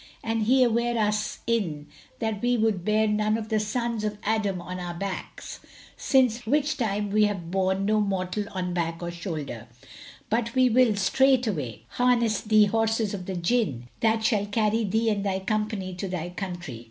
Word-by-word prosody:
and 225 -1 -1
he 260 +1 +5
sware 235 0 +1
us 210 -1 -1
in 180 -11 -1 0.3
that 220 -2 -2
we 245 0 +2
would 215 -5 +1
bear 215 +2 +2
none 210 +1 +1
of 220 -1 -6
the 220 -1 +2
sons 230 +1 -2
of 210 -1 -2
Adam 210 -3 0
on 180 +1 -6
our 175 -1 -5
backs; 195 +1 -6 0.4
since 245 -4 +2
which 295 +4 +2
time 210 -4 -1
we 215 +1 +4
have 185 -5 -3
borne 190 +1 +1
no 215 +1 +2
mortal 195 0 -1
on 180 -2 -3
back 170 -1 -2
or 175 - -3
shoulder: 155 - -6 0.6
but 230 +2 -1
we 255 -1 +5
will 240 -2 +4
straightway 200 - +1
harness 235 -4 +2
thee 215 -1 +5
horses 225 0 0
of 185 -3 -6
the 190 - -3
Jinn, 170 - 0
that 220 0 +2
shall 210 -3 +1
carry 215 +1 +1
thee 220 +2 +1
and 200 -1 -1
thy 195 -1 0
company 210 -1 -2
to 180 +2 -4
thy 175 -2 -4
country." 175 - -6
210 Hz, 175 wpm, -26 LUFS, 185-225 Hz, 0.6 s, he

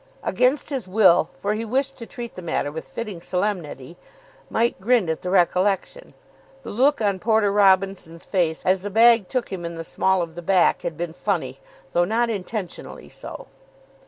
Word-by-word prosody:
Against 260 +4 +1
his 260 -9 -3
will, 185 -4 +4
for 205 +1 -1
he 215 +2 -3
wished 270 +4 -1
to 230 - -9
treat 240 -3 -7
the 185 - -8
matter 160 -4 -2
with 160 +2 -7
fitting 210 -7 -6
solemnity, 175 -6 -3 0.5
Mike 235 -2 0
grinned 220 -5 +2
at 160 - -4
the 180 - -4
recollection. 190 - +1 0.5
The - - -7
look 265 +5 +2
on 200 -3 +1
Porter 220 -1 +2
Robinson's 190 -4 +2
face 170 -5 -1
as 185 0 +3
the 205 - -4
bag 225 -1 +5
took 255 -2 -2
him 180 -2 -5
in 170 0 -5
the 165 - -5
small 190 +2 +1
of 165 -1 -8
the 175 - -7
back 180 0 +3
had 160 - -4
been 170 -1 -4
funny, 160 -9 -2 0.3
though 175 0 +3
not 230 +4 +1
intentionally 195 -2 -6
so. - - -9
195 Hz, 180 wpm, -23 LUFS, 175-225 Hz, 0.5 s, bag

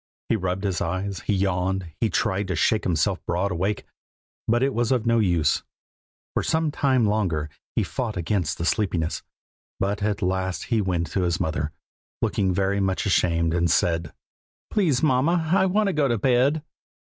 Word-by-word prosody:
He - - +3
rubbed 95 -1 -2
his 95 -3 -1
eyes, 95 +3 -2
he - - +2
yawned, 95 -2 -1
he 115 - +2
tried 100 +1 0
to 95 - -1
shake 105 +7 +2
himself 80 -5 0
broad 95 +3 0
awake, 95 +4 -1 0.6
but 120 +3 +2
it 135 0 +1
was 120 +1 0
of 125 -3 +1
no 115 0 +3
use. 85 -8 +2 0.7
For - - +1
some 160 -1 +1
time 130 -5 +2
longer 90 -8 0 0.2
he - - +2
fought 115 -6 -3
against 85 -2 -1
the 85 - -3
sleepiness, 90 -6 0 0.6
but 100 +1 -1
at 105 0 -1
last 95 0 -1
he 110 - +3
went 90 -3 -1
to 95 - 0
his 85 -1 0
mother, 75 -1 -1 0.5
looking 95 -2 +1
very 100 +2 +1
much 95 0 0
ashamed, 85 -4 +2
and 85 0 +1
said: 85 0 +1 0.6
"'Please, 160 - +2
mamma, 155 +4 +2
I 190 0 +4
want 210 +3 +2
to 195 - +1
go 150 -2 +2
to 120 -2 +1
bed!' 130 +6 +2
100 Hz, 175 wpm, -24 LUFS, 90-120 Hz, 0.7 s, I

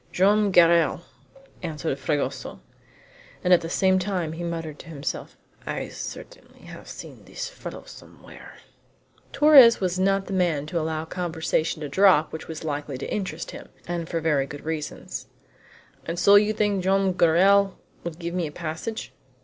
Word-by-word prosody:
"Joam 205 +3 +3
Garral," 170 -4 +4 0.6
answered 160 -4 -3
Fragoso. 145 +1 -3 0.8
And 180 - +4
at 175 - +5
the 165 - -5
same 190 +1 +2
time 180 -4 -2
he 165 +2 -6
muttered 165 -3 -5
to - - -12
himself: 150 -3 -5 0.3
"I - - -4
certainly - - -10
have - - -12
seen - - -10
this - - -6
fellow - - -9
somewhere!" - - -14 0.8
Torres 275 -6 +7
was 185 -1 -1
not 195 +1 +2
the 195 - -6
man 170 -6 +1
to 170 +3 -2
allow 160 0 -2
a - - -9
conversation 160 -2 -2
to - - -3
drop 185 0 +4
which 160 - -7
was 160 -1 -7
likely 145 -3 -4
to - - -5
interest 195 -3 -4
him, - - -10 0.2
and 170 -1 -4
for 165 - -1
very 150 -4 +1
good 145 0 -10
reasons. 160 -2 -5 0.8
"And 165 +1 -3
so 200 +3 +5
you 205 +1 +6
think 205 -3 0
Joam 195 0 +2
Garral 190 +4 +4 0.3
would 170 -2 -6
give 170 0 -5
me 175 -3 -1
a - - -8
passage?" 165 +8 -5
170 Hz, 165 wpm, -25 LUFS, 160-195 Hz, 0.8 s, Torres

